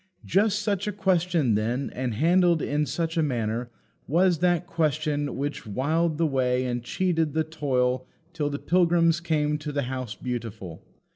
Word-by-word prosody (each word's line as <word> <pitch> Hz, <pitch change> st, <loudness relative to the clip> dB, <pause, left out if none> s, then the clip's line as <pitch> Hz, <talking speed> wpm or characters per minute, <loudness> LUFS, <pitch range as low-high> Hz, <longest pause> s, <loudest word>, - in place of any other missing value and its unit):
Just 210 Hz, +1 st, +2 dB
such 200 Hz, -1 st, -1 dB
a -, -, 0 dB
question, 180 Hz, -, +1 dB
then, 115 Hz, +6 st, -1 dB
and 125 Hz, -3 st, -3 dB
handled 170 Hz, -, +3 dB
in 150 Hz, 0 st, 0 dB
such 165 Hz, +2 st, -2 dB
a -, -, +4 dB
manner, 120 Hz, -4 st, -1 dB, 0.4 s
was 175 Hz, +2 st, +3 dB
that 175 Hz, 0 st, +2 dB
question 150 Hz, -3 st, -1 dB
which 145 Hz, -3 st, -4 dB
whiled 155 Hz, +8 st, 0 dB
the 165 Hz, -, +2 dB
way 130 Hz, -3 st, +1 dB
and 120 Hz, -1 st, -2 dB
cheated 165 Hz, +1 st, 0 dB
the 160 Hz, -, +1 dB
toil 130 Hz, -5 st, -1 dB, 0.3 s
till 150 Hz, -3 st, -1 dB
the 145 Hz, -, -3 dB
pilgrims 170 Hz, 0 st, +3 dB
came 150 Hz, -3 st, 0 dB
to 150 Hz, 0 st, -5 dB
the 145 Hz, -1 st, -1 dB
House 130 Hz, -3 st, -4 dB
Beautiful. 110 Hz, -9 st, -6 dB
150 Hz, 160 wpm, -26 LUFS, 125-170 Hz, 0.4 s, a